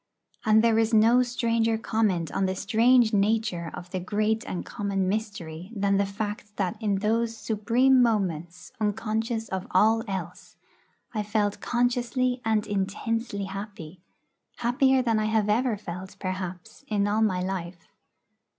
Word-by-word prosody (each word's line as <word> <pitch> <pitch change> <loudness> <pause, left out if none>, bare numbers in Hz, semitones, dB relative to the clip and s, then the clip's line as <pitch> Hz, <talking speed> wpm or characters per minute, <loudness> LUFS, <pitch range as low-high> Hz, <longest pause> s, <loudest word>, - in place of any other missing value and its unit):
And 220 0 +5
there 225 -1 +4
is 225 0 +2
no 230 +3 +6
stranger 230 -2 +1
comment 210 -7 0
on 195 - 0
the 190 - -2
strange 230 +3 +3
nature 205 -4 +1
of 175 0 -9
the 185 - -2
great 215 +4 0
and 180 - -4
common 195 -2 -2
mystery 190 -4 -4
than 200 -1 +2
the 200 0 +1
fact 205 +1 -5
that 195 +1 -1
in 205 -2 +1
those 225 +3 0
supreme 240 +5 +3
moments, 180 -7 -1
unconscious 220 +2 -1
of 190 -1 -4
all 220 +4 +3
else, 180 -3 -6 0.6
I 215 - -1
felt 205 -1 -1
consciously 245 +1 0
and 220 -1 +1
intensely 205 +2 -2
happy 195 -4 -7 0.5
happier 260 +2 +2
than 225 -3 +2
I 215 - 0
have 215 -1 +1
ever 230 +1 +2
felt, 185 -1 -8
perhaps, 185 -1 -5
in 205 -2 +1
all 210 +2 +1
my 185 -4 +1
life. 180 -2 -5
210 Hz, 145 wpm, -26 LUFS, 190-225 Hz, 0.6 s, no